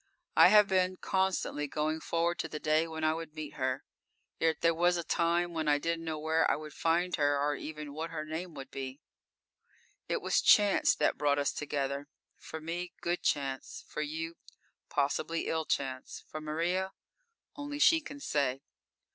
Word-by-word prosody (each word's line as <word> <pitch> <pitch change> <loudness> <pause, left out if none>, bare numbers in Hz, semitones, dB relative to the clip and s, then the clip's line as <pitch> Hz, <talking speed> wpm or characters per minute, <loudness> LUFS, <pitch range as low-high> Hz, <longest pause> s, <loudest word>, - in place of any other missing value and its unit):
I - - +9
have 210 -1 +7
been 185 -1 +2
constantly 190 -7 0
going 155 +2 -1
forward 170 +1 0
to - - -1
the 155 - -5
day 155 +2 +2
when 160 -1 -5
I 155 0 +3
would 160 -1 -7
meet 155 -1 -6
her, 130 0 -1 0.6
yet 160 -1 +1
there 165 0 +4
was 175 +2 +3
a 170 - -2
time 170 +1 +1
when 160 -2 -2
I 145 0 +5
didn't 165 +2 -2
know 160 -1 -2
where 160 +1 +2
I - - +3
would 155 -1 -8
find 175 +2 +1
her, 145 -1 +2
or 145 +1 +1
even 150 -1 -7
what 160 +2 -4
her 155 -2 -4
name 160 +2 -5
would 135 -1 -8
be!_ 130 0 -5 1.1
_It - - +1
was - - +2
chance 205 -2 +5
that - - +1
brought 145 -1 +3
us 145 -1 +1
together. 140 -1 -2 0.3
For 160 - -7
me, 175 +3 -4
good 175 +1 -1
chance; 135 -2 -2
for - - -4
you, 160 +2 -4 0.5
possibly 150 +3 0
ill 160 -1 -1
chance; 130 -3 -3
for 155 - -6
Maria? 175 +5 -1 0.6
Only 290 0 -5
she 325 +2 +6
can 285 -1 -9
say. 140 - 0
160 Hz, 180 wpm, -31 LUFS, 145-170 Hz, 1.1 s, I